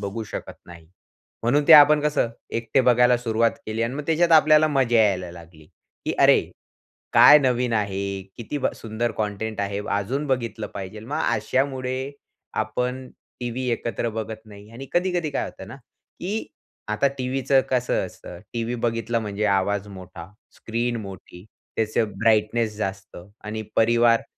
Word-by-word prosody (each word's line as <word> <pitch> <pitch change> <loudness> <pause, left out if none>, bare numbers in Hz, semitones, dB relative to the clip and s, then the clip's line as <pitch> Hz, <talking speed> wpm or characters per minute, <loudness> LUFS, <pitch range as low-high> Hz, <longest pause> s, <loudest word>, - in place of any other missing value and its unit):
बघू 100 +3 -4
शकत - - -6
नाही. 85 -2 -13 0.6
म्हणून 140 +5 +2
ते - - +10
आपण 150 0 +8
कसं 145 -5 0 0.3
एकटे 115 +3 +1
बघायला 125 0 +5
सुरुवात 115 -1 +1 0.2
केली 110 +1 -2
अन् 115 +3 -2
मग 150 - -4
त्याच्यात 165 +1 +2
आपल्याला 155 -1 +6
मजा 130 -5 +2
यायला 95 -4 0
लागली 85 -2 -14 0.4
की - - -1
"अरे, - - +6 0.7
काय 150 - +9
नवीन 125 -3 0
आहे, 100 -2 -2
किती 120 +5 -5
ब - - 0
सुंदर 115 +1 -3
कंटेंट 105 0 -3
आहे. 100 0 -2
अजून 110 +9 -1
बघितलं 120 -5 -2
पाहिजेल." 100 +3 -7
मग 150 +3 -3 0.2
अशामुळे 130 +3 -2 0.5
आपण 125 +4 -3 0.3
टीव्ही 125 +1 -3
एकत्र 115 0 -2
बघत 110 0 -8
नाही 105 0 -14
आणि 130 +4 -9
कधी-कधी 175 -3 0
काय 140 - -2
होतं - - -10
ना, - - -9
की 185 - -7 0.4
आता 105 +6 +1
टीव्हीचं 130 +1 +1
कसं 125 -1 0
असतं. 90 - -11
टीव्ही 115 0 -2
बघितलं 115 0 -1
म्हणजे 105 -1 -3
आवाज 100 +1 -2
मोठा, 95 -3 -10 0.3
स्क्रीन 120 +1 -2
मोठी, 95 -2 -11 0.3
त्याचं 110 0 0
ब्राइटनेस 110 0 +1
जास्त 95 -2 -5 0.3
आणि 110 +1 -4
परिवार 115 0 +4
115 Hz, 150 wpm, -23 LUFS, 105-130 Hz, 0.7 s, ते